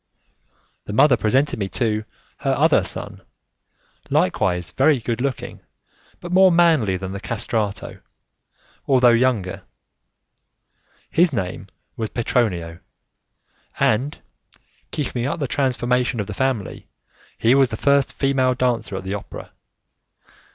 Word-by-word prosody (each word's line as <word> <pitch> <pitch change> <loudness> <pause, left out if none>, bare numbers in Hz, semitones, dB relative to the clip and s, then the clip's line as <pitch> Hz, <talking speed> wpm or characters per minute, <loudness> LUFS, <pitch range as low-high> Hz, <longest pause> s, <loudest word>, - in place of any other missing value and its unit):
The 105 - -6
mother 130 +4 +5
presented 110 -2 0
to 120 - 0
me 105 +1 -3 0.3
her - - 0
other - - +3
son, - - -6 0.9
likewise 90 -1 0
very 140 +2 +3
good 120 0 -3
looking, 135 -1 -3 0.6
but 175 - -8
more 190 0 +6
manly 160 - +3
than 95 0 -6
the 100 - -5
'castrato', 105 0 -3 0.9
although 125 -3 +5
younger. 115 -6 +1 1.5
His 175 0 +3
name 95 -8 -4 0.3
was 110 -2 -3
Petronio, 90 -9 -1 1.0
and, 130 +7 +1 0.7
keeping 125 -4 -3
up 165 +4 -3
the 140 - -1
transformations 125 -2 0
of 105 - -1
the 105 - -6
family, 130 -3 -2 0.5
he 115 +2 +3
was 135 -2 +4
the 110 - -5
first 140 +1 +2
female 130 -2 +1
dancer 120 -5 -1
at 95 - -5
the 95 +1 -4
opera. 105 - -8
120 Hz, 120 wpm, -21 LUFS, 105-135 Hz, 1.5 s, more